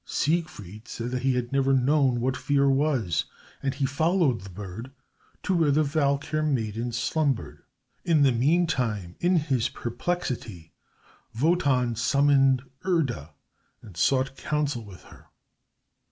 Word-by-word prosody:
Siegfried 145 - -2
said 120 +1 -5
that 125 0 -2
he 130 0 +1
had 120 -1 -2
never 135 0 +2
known 130 -2 +2
what 130 +1 0
fear 140 +1 +1
was, 135 - +1 0.4
and 135 -1 -2
he 140 -1 0
followed 155 - +1
the 95 - -10
bird 100 +6 -8 0.5
to 190 - 0
where 165 -3 +3
the 150 +2 +3
Valkyr 145 0 0
maiden 120 -5 -1
slumbered. 135 +2 -1 0.4
In 160 -4 +3
the 135 - +5
meantime, 125 - 0
in 180 +1 +2
his 140 -8 +1
perplexity, 120 - -4 0.7
Wotan 135 -6 +2
summoned 135 +1 +3 0.2
Erda 130 - -1 0.5
and 100 -5 -13
sought 135 +8 +1
counsel 145 -5 -2
with 100 -4 -13
her. - - -17
135 Hz, 130 wpm, -26 LUFS, 120-150 Hz, 0.7 s, the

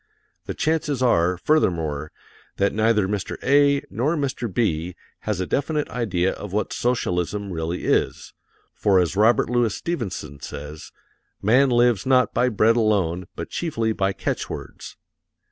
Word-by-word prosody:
The - - -4
chances 150 -4 0
are, 90 -6 +3
furthermore, 80 - 0 0.5
that 100 0 +1
neither 110 -2 +2
Mr. 100 0 -3
A. 140 +1 +4
nor 145 +8 0
Mr. 130 -6 -2
B. 90 -5 -1 0.3
has 105 -4 0
a 95 - -1
definite 150 - -1
idea 95 -7 0
of 105 - -8
what 105 +2 -1
socialism 100 -4 -1
really 80 +2 -3
is, - - 0 0.4
for 100 -2 +2
as 90 0 0
Robert 110 +3 +4
Louis 120 -2 +1
Stevenson 95 - -4
says, 75 +1 -8 0.5
"Man 130 +7 +4
lives 120 -3 +2
not 130 -1 +3
by 125 - +2
bread 115 +1 +3
alone 95 -6 +1
but - - -6
chiefly 115 -10 -1
by 95 -2 0
catch 95 - -3
words." - - -8
105 Hz, 145 wpm, -23 LUFS, 90-125 Hz, 0.5 s, A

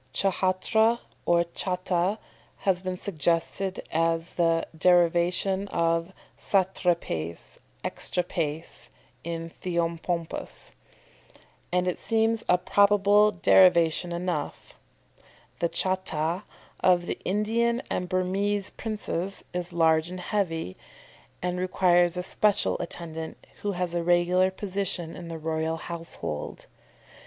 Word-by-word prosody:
Ch'hatra 195 +4 +2 0.3
or 170 0 +4
cháta 180 +2 -1 0.4
has 185 -2 +1
been 185 -1 -3
suggested 175 +2 -1
as 165 +1 0
the 165 -1 +2
derivation 175 +3 +3
of 165 0 0 0.2
satrapaes 175 - -1 0.3
(exatrapaes 165 -3 -2 0.4
in 165 0 -4
Theopompus), 170 - -3 1.0
and 180 0 +2
it 180 - -1
seems 225 0 +1
a 180 - +6
probable 205 +2 +4
derivation 175 -2 +4
enough. 170 -3 -3 0.9
The 170 - +1
cháta 185 -1 -1 0.3
of 180 -1 +3
the - - -4
Indian 230 +4 +1
and 180 0 -2
Burmese 195 +2 0
princes 195 -4 -4
is 180 0 -3
large 160 -1 +3
and 185 0 -6
heavy, 175 - -2 0.7
and 180 0 -1
requires 180 -1 +3
a 180 - -2
special 205 +2 +2
attendant, 160 -2 -6 0.2
who 205 -1 -1
has 180 -1 -2
a 175 - 0
regular 175 +2 +3
position 190 -3 -3
in 175 - -8
the 165 -1 -5
royal 160 0 -2
household. 165 - -6
180 Hz, 105 wpm, -27 LUFS, 165-190 Hz, 1.0 s, a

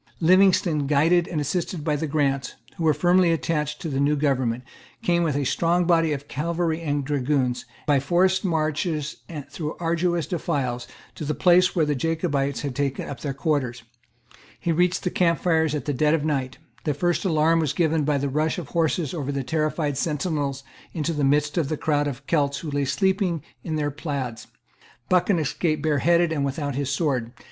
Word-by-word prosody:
Livingstone, 175 -4 +4
guided 165 +4 +3
and 160 - -2
assisted 160 +2 -2
by 150 -1 +1
the 155 +2 -2
Grants, 140 -3 0 0.2
who 165 - -3
were 155 - +5
firmly 180 0 +4
attached 150 -2 -1
to - - -5
the 135 -3 -2
new 145 +2 +3
government, 130 -4 0 0.4
came, 175 -1 +2
with 160 -5 0
a 145 - 0
strong 170 +6 +1
body 165 -2 +3
of 145 -1 -4
cavalry 165 +2 -1
and 145 -3 -1
dragoons, 135 -3 0 0.2
by 145 -3 +3
forced 180 +6 +2
marches 155 -2 -1
and 150 -5 -7
through 150 +1 -5
arduous 170 0 0
defiles, 140 -9 -2 0.3
to - - -7
the 150 0 -2
place 180 0 +4
where 165 -3 +3
the 150 - 0
Jacobites 140 -2 -1
had 140 -3 -4
taken 140 -1 -2
up 135 - -6
their 145 - -3
quarters. 135 -4 -1 0.8
He 170 - -1
reached 180 +2 +1
the 180 - -1
camp 170 -2 +2
fires 160 -3 +2
at 150 - -4
dead 150 +2 +2
of 155 -2 -2
night. 135 -4 -1 0.3
The 150 -3 -1
first 175 +3 0
alarm 165 -2 +3
was 155 -4 +1
given 160 -1 +1
by 145 0 +1
the 140 +1 -1
rush 155 +3 0
of 175 - -4
the - - -18
horses 165 -2 0
over 145 -5 -3
the 140 -1 -2
terrified 155 -1 -1
sentinels 145 -3 -2 0.3
into 160 0 -1
the 150 -2 -1
midst 145 +3 +2
Of 145 -4 -1
the 155 - -1
crowd 145 -1 +1
of 140 0 -6
Celts 140 -3 +1
who 150 - -4
lay 145 0 0
sleeping 190 0 0 0.2
in 160 - -3
their 145 -1 -1
plaids. 140 -6 -5 0.6
Buchan 185 +1 +3
escaped 155 0 -1
bareheaded 165 +3 +3
and 150 -3 0
without 140 +1 -2
his 140 +1 -2
sword. 135 -6 -1
150 Hz, 190 wpm, -24 LUFS, 140-170 Hz, 0.8 s, were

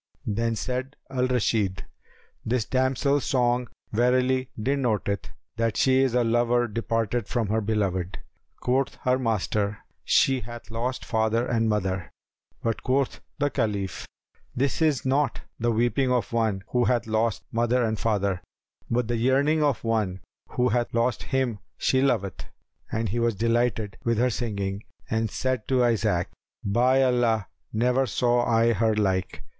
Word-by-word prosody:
Then 115 +2 0
said 130 +4 -3 0.2
Al 130 -1 +1
Rashid, 105 -6 0 0.6
"This 115 -1 0
damsel's 130 +2 +1
song 125 -2 +1 0.2
verily 125 +3 +2
denoteth 110 - 0 0.3
that 115 -1 0
she 130 0 +4
is 130 -3 +1
a 125 - +4
lover 120 +1 +2
departed 115 0 -1
from 115 -5 -1
her 110 +1 +1
beloved." 95 -4 -1 0.4
Quoth 130 +1 +1
her 125 +1 +2
master, 105 -3 0 0.3
"She 135 -1 +3
hath 120 +1 -9
lost 120 +3 -3
father 110 +1 +1
and 115 -2 +1
mother;" 95 -4 -1 0.5
but 115 -1 -1
quoth 135 +1 0 0.2
the 145 -1 0
Caliph, 100 -3 -2 0.5
"This 140 +5 0
is 150 -5 +2
not 135 0 +1 0.2
the 120 +1 +1
weeping 120 +3 +1
of 125 -2 0
one 110 -4 0
who 125 -1 +2
hath 120 -2 +1
lost 110 0 0
mother 120 +2 +2
and 110 -2 -1
father, 100 -4 0 0.5
but 120 -1 +1
the 120 0 0
yearning 140 +6 +2
of 145 -6 +1
one 110 -5 0 0.3
who 125 0 +1
hath 120 +1 0
lost 120 0 +1
him 130 -5 0 0.2
she 130 - +2
loveth." 110 -9 0 0.5
And 110 -1 -1
he 120 +5 -1
was 115 -2 +1
delighted 115 -1 0
with 115 -1 +1
her 125 +2 +2
singing 100 -3 -3 0.3
and 110 0 +1
said 130 0 -2
to 130 -2 +3
Isaac, 110 -7 +1 0.4
"By 125 +6 +3
Allah, 120 -5 +2 0.2
never 125 +4 +2
saw 120 +3 +2
I 115 0 +3
her 110 +1 +2
like!" 95 -3 -1
115 Hz, 150 wpm, -26 LUFS, 110-125 Hz, 0.6 s, she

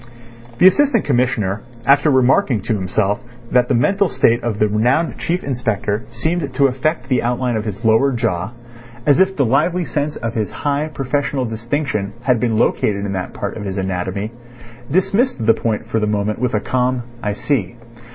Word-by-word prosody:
The 180 - +4
Assistant 240 +4 +4
Commissioner 120 -7 0 0.2
after 140 +3 +5
remarking 130 -3 +3
to - - -1
himself 100 +1 0 0.3
that 125 -1 +3
the - - +1
mental 195 +9 +2
state 120 -4 +2
of 115 -3 -2
the 105 - +3
renowned 120 +10 +1
Chief 180 +2 -1
Inspector 115 -4 -2
seemed 145 +5 -2
to 140 - +4
affect 130 +1 0
the 130 -2 +1
outline 125 0 -1
of 110 0 -2
his 105 +2 -5
lower 115 +5 +4
jaw, 110 -5 -1 0.5
as 145 +3 +4
if 190 0 +3
the 140 - +2
lively 170 +9 +1
sense 150 0 -2
of 115 -1 -4
his 110 -3 -1
high 145 +1 -1
professional 140 -2 -2
distinction 110 -2 -2
had 125 -2 +2
been 115 -2 0
located 100 -2 +1
in 100 - -3
that 90 -1 -4
part 100 - -4
of 105 - -6
his 95 -1 -4
anatomy, 95 +2 -3 0.6
dismissed 190 - +1
the 115 - +6
point 110 -2 -2
for 110 - 0
the 105 - 0
moment 105 +1 -1
with 125 -1 0
a - - +2
calm 125 +2 0 0.2
"I 105 - -1
see." 110 -3 -1
120 Hz, 180 wpm, -19 LUFS, 105-140 Hz, 0.6 s, the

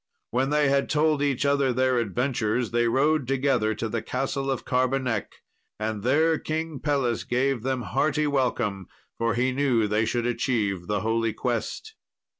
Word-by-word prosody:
When 130 +3 +1
they 150 0 +3
had 140 0 +1
told 155 -1 +2
each 140 -2 0
other 140 -2 +2
their 130 0 +2
adventures, 115 +1 -1
they 120 0 +2
rode 140 +3 +2
together 130 -5 +1
to 115 +2 -3
the 115 +1 -2
Castle 135 +3 -2
of 135 - -2
Carbonek: 125 -3 0 0.5
and 110 -1 -2
there 155 +7 +2
King 160 -2 -3
Pelles 135 -5 0
gave 125 0 0
them 130 0 -2
hearty 145 +9 0
welcome, 120 - -1 0.3
for 115 0 +1
he 125 +2 +1
knew 130 -5 +1
they 105 +2 +1
should 120 +1 -1
achieve 105 -7 -1
the 105 -1 -1
Holy 115 +1 0
Quest. 125 - -3
125 Hz, 160 wpm, -26 LUFS, 115-140 Hz, 0.5 s, they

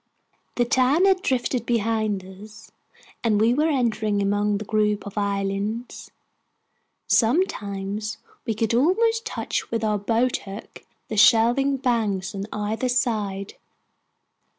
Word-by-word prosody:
The 240 - +2
town 260 - +3
had 380 -1 +3
drifted 250 -3 0
behind 220 -4 0
us, 205 +3 -13 0.5
and 215 -3 +2
we 225 +3 +4
were 305 +5 +2
entering 220 -7 0
among 205 +1 +1
the 210 - -6
group 210 -1 0
of 200 - -8
islands. 200 +3 -3 1.0
Sometimes 215 - 0 0.3
we 225 -3 -2
could 225 +1 0
almost 450 - +2
touch - - -3
with 230 -1 -2
our 210 -1 +1
boat 230 +4 +1
hook 195 +2 -10 0.2
the 215 - -5
shelving 240 +6 +4
banks 220 -6 -1
on 195 0 -4
either 220 +4 -2
side. 210 -6 -1
220 Hz, 125 wpm, -24 LUFS, 205-245 Hz, 1.0 s, we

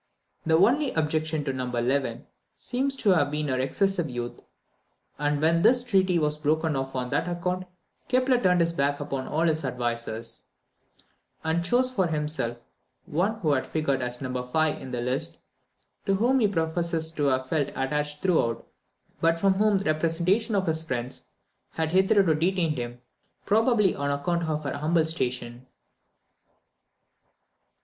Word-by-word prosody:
The 160 0 +5
only 255 - +3
objection 155 0 0
to 135 -2 -2
No. 130 -1 -3
11 125 0 -1 0.3
seems 270 +2 -1
to 215 -6 +2
have 155 -6 +3
been 150 0 -2
her 130 -1 0
excessive 175 +5 0
youth; 120 -1 -5 0.8
and 145 0 0
when 165 +2 +3
this 245 +5 +5
treaty 190 -6 +2
was 150 -1 0
broken 155 +1 +1
off 135 0 -3
on 125 -1 -3
that - - 0
account, 180 +1 -2 0.4
Kepler 255 -1 +3
turned 180 -2 +3
his 170 0 +1
back 145 -2 0
upon 140 -2 -4
all 155 - -1
his 160 -2 +1
advisers, 120 -3 -3 1.0
and 160 +1 0
chose 250 +7 +2
for 190 -8 +1
himself 150 -6 -2 0.5
one 200 +8 -1
who 155 -4 +2
had 130 -2 0
figured 140 -4 0
as 125 +1 -4
No. 125 -1 -3
5 155 +5 0
in 130 - -8
the 125 -1 -3
list, 125 -8 -1 0.7
to 195 - +3
whom 245 +6 +3
he 220 - +4
professes 165 -2 -1
to 150 -3 -1
have 130 -1 +1
felt 145 -1 0
attached 150 +2 -2
throughout, 160 -11 +1 0.5
but 165 0 +2
from 195 +2 +4
whom 205 +1 +3
the 195 - -4
representations 170 +8 +1
of 190 - 0
his 160 -1 -1
friends 125 -4 -4 0.5
had 160 -1 -1
hitherto 190 -1 +4
detained 165 -2 0
him, 120 0 -5 0.5
probably 215 -2 +3
on 140 0 -2
account 170 +4 -1
of 155 -1 -2
her 140 - -3
humble 155 +3 +1
station. 125 -5 -2
160 Hz, 155 wpm, -26 LUFS, 135-185 Hz, 1.0 s, The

